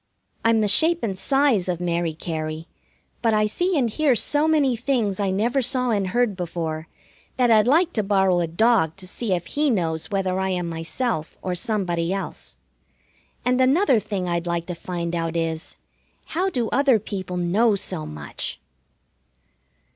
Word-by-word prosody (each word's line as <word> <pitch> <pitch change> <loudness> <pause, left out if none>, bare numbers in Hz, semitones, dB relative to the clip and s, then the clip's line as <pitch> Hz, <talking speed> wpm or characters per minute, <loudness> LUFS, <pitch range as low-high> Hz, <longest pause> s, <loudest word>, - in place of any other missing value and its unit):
I'm 225 -1 +3
the 210 - +2
shape 325 - +4
and 200 -4 -1
size 230 -1 +2
of 175 -2 -1
Mary 170 -2 -1
Cary, 155 0 -5 0.5
but 225 -2 +2
I 215 0 +3
see 355 - 0
and 255 -4 +2
hear 275 +3 +2
so 295 +6 +2
many 290 -5 +3
things 230 -5 -1
I 200 -1 +1
never 230 +8 +1
saw 250 0 +1
and 200 -3 0
heard 235 +1 +1
before 165 -3 -4 0.5
that 245 -2 +3
I'd 215 0 +5
like 330 +6 +3
to 215 - +1
borrow 190 -3 +2
a 170 - 0
dog 170 -2 +2
to 190 - -10
see 205 +3 -3
if 175 -1 -2
he 295 0 0
knows 165 -7 -1
whether 190 -2 -1
I 190 0 0
am 180 -2 -2
myself 165 +2 -3
or 185 - -2
somebody 180 -4 -1
else. 190 - -5 0.9
And 250 +1 +2
another 265 - +4
thing 200 -3 -4
I'd 170 0 -2
like 170 -1 -1
to 180 - -5
find 170 0 -4
out 165 0 -2
is, 165 -1 -3 0.5
How 365 +4 -1
do 245 -10 -1
other 275 -3 +3
people 190 -3 -5
know 200 +6 +2
so 75 - -4
much? 75 -1 -6
195 Hz, 170 wpm, -23 LUFS, 170-245 Hz, 0.9 s, I'd